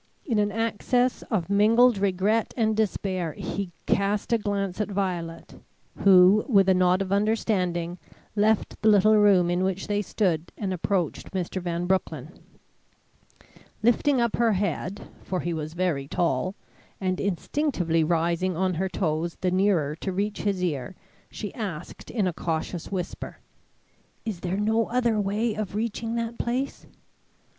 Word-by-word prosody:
In 230 -7 +1
an 205 0 +1
access 230 +3 0
of 185 -7 0
mingled 220 +3 +4
regret 200 +3 +1
and 220 -2 +2
despair, 185 -6 -1
he 195 +3 -4
cast 200 +3 0
a 230 - +3
glance 200 -2 -2
at 210 - -2
Violet, 180 -4 -4 0.4
who, 190 +2 +6
with 195 -5 +5
a 190 - +6
nod 185 +1 +3
of 190 - -7
understanding, 185 -5 0 0.4
left 215 0 +1
the 220 - +4
little 215 +1 +5
room 195 -4 +5
in 175 +1 +1
which 190 0 -1
they 205 0 0
still 205 -1 +1
stood, 160 +2 -20
and 195 -3 -2
approached 180 -2 -1
Mr. 185 0 -3
Van 175 0 -2
Broecklyn. 165 -5 -1 1.5
Lifting 250 +4 +3
up 235 -2 +1
her 230 -2 +3
head, 200 0 -2
for 185 -1 -3
he 175 - -2
was 155 0 -5
very 170 -7 -1
tall, 170 +4 0 0.4
and 185 -1 -1
instinctively 180 - 0
rising 170 +2 0
on 185 0 +1
her 190 +3 -1
toes 165 -2 -2
the 185 -1 +1
nearer 180 -6 +2
to 190 - -3
reach 200 +3 -2
his 195 -3 -1
ear, 150 -1 -2 0.3
she 205 - -6
asked 185 -7 -6
in 215 -5 0
a 180 - 0
cautious 165 +2 -3
whisper: 180 -2 -5 0.9
"Is 215 -6 -3
there 180 +2 -2
no 220 +2 +1
other 235 -3 +1
way 210 +3 0
of 210 -2 -4
reaching 225 +1 -2
that 230 0 -3
place?" 255 +3 -2
195 Hz, 150 wpm, -26 LUFS, 175-215 Hz, 1.5 s, who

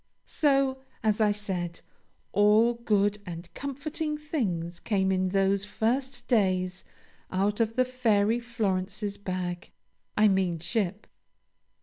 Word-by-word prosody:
So, 275 -3 +2 0.2
as 215 0 +2
I 215 - +5
said, 185 -5 -3 0.5
all 210 +3 +5
good 210 -3 +1
and 170 -1 -8
comforting 300 +2 -3
things 190 - -2
came 190 -3 +1
in 185 0 +1
those 195 +1 +2
first 245 +4 -1
days 185 -5 +1 0.5
out 200 +3 0
of 225 -1 +1
the 255 0 +3
Fairy 230 -3 +2
Florence's 205 -3 -2
bag 180 -2 -4 0.5
I 215 0 +6
mean 190 -4 +2
ship. 200 +3 -2
205 Hz, 115 wpm, -28 LUFS, 185-235 Hz, 0.5 s, I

